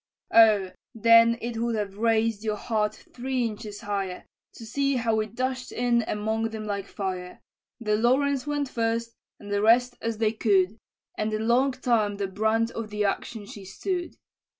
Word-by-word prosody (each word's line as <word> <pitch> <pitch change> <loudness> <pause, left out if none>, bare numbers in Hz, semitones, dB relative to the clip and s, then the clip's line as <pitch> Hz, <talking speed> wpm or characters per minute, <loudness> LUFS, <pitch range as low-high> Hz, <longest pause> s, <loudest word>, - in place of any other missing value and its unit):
"Oh! 215 -5 +6 0.2
then 230 +1 +6
it 235 -1 -3
would 235 0 0
have 205 -1 -4
raised 225 -1 +1
your 215 -1 -1
hat 215 -1 -1 0.2
three 255 0 -1
inches 210 -2 -6
higher, 195 -3 -3 0.3
To 230 - -10
see 275 +4 0
how 230 -2 +1
we 215 0 0
dash'd 255 +3 -3
in 240 -1 +1
among 220 +2 -1
them 220 -1 -6
like 200 -1 -3
fire! 185 -2 -5 0.4
The 215 -3 +1
Lawrence 265 +4 +2
went 290 -1 -1
first, 230 -1 -1 0.3
and 205 -1 -9
the 205 - +1
rest 245 +3 +4
as 225 -1 -2
they 220 -1 +2
could, 205 -1 +2 0.4
And 215 0 0
a - - -2
long 245 +5 +2
time 225 -5 +1
the 200 - -1
brunt 220 +4 0
of 225 -2 -5
the 210 0 -1
action 205 +2 -3
she 200 0 -10
stood. 350 - -4
225 Hz, 175 wpm, -26 LUFS, 210-235 Hz, 0.4 s, Oh